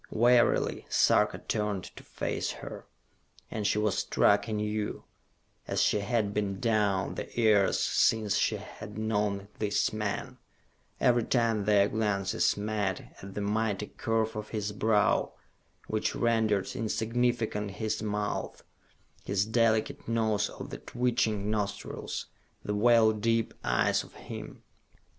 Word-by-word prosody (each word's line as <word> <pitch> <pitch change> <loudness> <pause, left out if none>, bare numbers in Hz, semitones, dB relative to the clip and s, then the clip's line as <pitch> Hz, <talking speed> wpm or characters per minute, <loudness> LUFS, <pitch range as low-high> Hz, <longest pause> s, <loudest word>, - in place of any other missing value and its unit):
Wearily 120 +2 +3
Sarka - - +3
turned 105 -4 -2
to - - -10
face - - -3
her, - - -9 0.6
and 105 -2 -1
she - - +1
was 105 -2 +1
struck 100 +3 +3
anew, 105 -1 -2 0.6
as - - -1
she 105 - +3
had 105 -1 0
been 100 -2 -1
down 105 -4 +1
the - - -6
years 105 -4 +4
since 110 -3 +2
she 110 - +2
had 105 0 -9
known 105 -2 -1
this 105 0 +1
man, 105 -2 -3 0.6
every 120 -1 +3
time 115 -4 +1
their 100 -1 +4
glances 100 -4 0
met, 105 -2 -2
at 95 0 -9
the 105 - -2
mighty 105 0 0
curve 110 0 0
of 105 0 -5
his 105 -2 -3
brow, 105 0 +2 0.5
which 110 0 -1
rendered 110 -4 +1
insignificant 115 -2 -1
his 105 +3 -3
mouth, 105 -1 -3 0.6
his 100 0 0
delicate 110 -1 +1
nose 110 -3 +1
of - - -9
the - - -6
twitching 115 -4 0
nostrils, 105 -2 -3 0.4
the 105 - -1
well 110 +1 +5
deep 115 +1 0
eyes - - +2
of - - -16
him. - - -9
105 Hz, 130 wpm, -29 LUFS, 105-110 Hz, 0.6 s, well